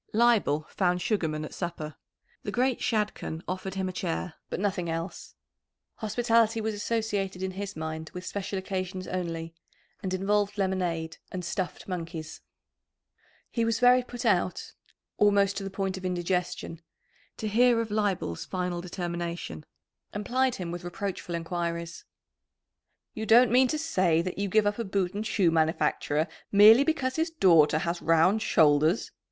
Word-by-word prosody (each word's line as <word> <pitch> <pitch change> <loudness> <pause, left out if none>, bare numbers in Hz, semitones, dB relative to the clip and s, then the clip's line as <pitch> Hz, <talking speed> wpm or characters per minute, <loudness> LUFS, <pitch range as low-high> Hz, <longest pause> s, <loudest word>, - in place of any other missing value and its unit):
Leibel 215 -10 +3
found 180 -2 0
Sugarman 160 -7 -1
at - - -9
supper. 170 -4 -5 0.5
The - - -5
great 255 0 +1
Shadchan 210 -7 -2
offered 185 +1 -4
him 190 -1 -1
a - - -3
chair, 180 -1 -3 0.2
but - - -3
nothing 190 -4 -1
else. 165 +2 -5 0.6
Hospitality 225 0 +2
was 220 0 -1
associated 205 -3 -2
in 190 - -2
his 200 +1 -6
mind 160 0 -5
with 180 0 -8
special 200 +1 -4
occasions 185 -1 -4
only, 165 -2 -4 0.5
and 190 - -3
involved 205 +2 0
lemonade 180 -4 -1
and 180 -1 -4
"stuffed 175 +1 -4
monkeys." 165 -3 -6 1.1
He 230 - 0
was 230 -1 +1
very 250 0 +6
put 245 -1 -7
out 185 -4 +1 0.5
almost 200 -1 +4
to 200 - -3
the 195 - -4
point 195 -1 -2
of 190 - -9
indigestion 180 -2 -2 0.6
to 215 - -3
hear 235 +2 +4
of 225 -2 -2
Leibel's 200 - -1
final 180 -2 -3
determination, 175 - -5 0.5
and 205 0 -4
plied 260 0 +1
him 175 -2 -5
with 175 0 -6
reproachful 175 -1 -4
enquiries. 170 0 -4 1.1
"You 220 0 -5
don't 235 +3 +6
mean 255 +1 +5
to 310 - -1
say 185 - +2
that 185 +2 -4
you 200 0 -1
give 215 +2 +3
up 205 +2 0
a - - 0
boot 190 -2 -1
and 210 +2 -3
shoe 185 -8 +2
manufacturer 155 -1 +1 0.2
merely 215 +6 +8
because 280 -4 -1
his 325 +2 +1
daughter 170 - +5
has 170 +2 -2
round 165 +6 +3
shoulders!" 155 0 +3
185 Hz, 155 wpm, -28 LUFS, 170-215 Hz, 1.1 s, merely